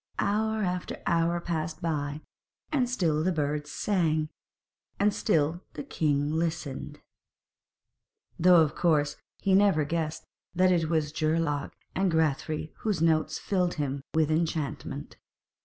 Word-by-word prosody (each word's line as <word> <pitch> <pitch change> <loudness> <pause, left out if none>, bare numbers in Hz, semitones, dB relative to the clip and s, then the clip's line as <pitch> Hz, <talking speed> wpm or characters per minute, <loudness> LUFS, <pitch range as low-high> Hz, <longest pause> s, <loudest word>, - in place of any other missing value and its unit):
Hour 220 +1 +1
after 180 -1 -3
hour 170 0 +2
passed 160 -2 -3
by, 150 -3 -2 0.5
and 260 -5 +1
still 160 -10 +1
the 185 - +2
birds 150 -2 -2
sang, 160 -4 +1 0.7
and 205 +1 +3
still 160 +1 +1
the - - -5
king 145 - 0
listened, 160 -4 -3 1.4
though 175 0 +7
of 155 -2 +2
course 150 -4 +2 0.3
he 195 - +2
never 190 -6 +4
guessed 160 0 -2 0.3
that 185 +1 +4
it 165 -3 +2
was 155 -3 +1
Geirlaug 155 -2 0 0.2
and 190 -1 +1
Grethari 155 0 0
whose 210 -6 -1
notes 155 -1 +2
filled 180 -3 0
him 140 -2 -2
with 160 -1 +3
enchantment. 160 -2 -2
160 Hz, 125 wpm, -28 LUFS, 155-180 Hz, 1.4 s, though